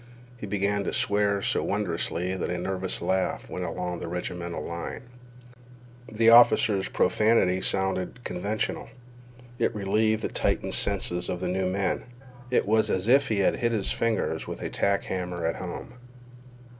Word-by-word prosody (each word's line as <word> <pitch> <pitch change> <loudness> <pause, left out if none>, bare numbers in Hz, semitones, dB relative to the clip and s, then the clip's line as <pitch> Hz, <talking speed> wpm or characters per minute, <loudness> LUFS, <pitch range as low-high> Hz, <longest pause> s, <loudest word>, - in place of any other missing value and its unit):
He 110 -4 -7
began 100 0 0
to - - -2
swear 100 -1 +2
so - - +1
wondrously 90 -2 -1
that 95 - -3
a 90 - -2
nervous 95 +1 -2
laugh 95 0 -1
went 90 - -3
along 90 +1 -4
the - - -5
regimental 90 0 -4
line. 85 +8 -5 1.1
The 115 +1 +4
officer's 115 -4 +6
profanity 105 -4 +2
sounded 95 +5 -2
conventional. 100 +4 -3 0.7
It 120 - +1
relieved 110 +2 +1
the - - +1
tightened - - -1
senses 90 0 0
of 90 - -2
the 90 0 -2
new 95 +1 0
men. 95 0 -1 0.4
It 125 - +2
was 110 +1 +3
as 95 +1 0
if 135 +3 +5
he 105 -3 +1
had - - +2
hit 120 -1 0
his 105 -3 0
fingers 115 -3 -1
with - - -6
a - - -4
tack 100 0 +1
hammer 90 -2 -3
at 80 - -1
home. 95 +6 -7
95 Hz, 155 wpm, -27 LUFS, 90-110 Hz, 1.1 s, officer's